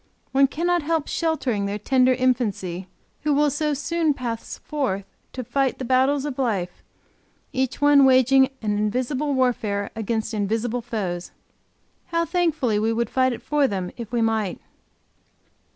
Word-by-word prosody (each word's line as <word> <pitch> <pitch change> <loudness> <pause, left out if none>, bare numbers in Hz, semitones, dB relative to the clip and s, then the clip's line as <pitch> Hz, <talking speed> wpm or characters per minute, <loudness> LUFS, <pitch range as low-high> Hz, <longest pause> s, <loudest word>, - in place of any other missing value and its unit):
One 275 +1 +5
cannot 345 +4 0
help 315 0 -1
sheltering 260 -11 -1
their 200 +1 -2
tender 255 +4 +3
infancy, 210 -8 -1 0.3
who 300 -1 +1
will 295 0 +3
so 300 0 0
soon 305 +2 0
pass 235 -3 -5
forth 250 -10 -2 0.3
to 255 - -4
fight 270 +2 0
the 260 - -5
battle 260 +3 +3
of 275 -3 -5
life, 195 -9 -1 0.7
each 260 +1 -1
one 290 -1 +6
waging 265 0 +5
an 210 -1 0
invisible 255 +7 -1
warfare 215 -6 0
against 225 0 -2
invisible 225 +3 -1
foes. 195 -7 -4 0.8
How 335 -1 0
thankfully 315 - +1
we 220 +1 +1
would 230 0 -1
fight 260 0 +2
it 240 - -6
for 295 -2 +2
them, 190 -5 -3
if 235 -3 -8
we 235 -2 +1
might! 220 -4 0
255 Hz, 150 wpm, -23 LUFS, 220-285 Hz, 0.8 s, one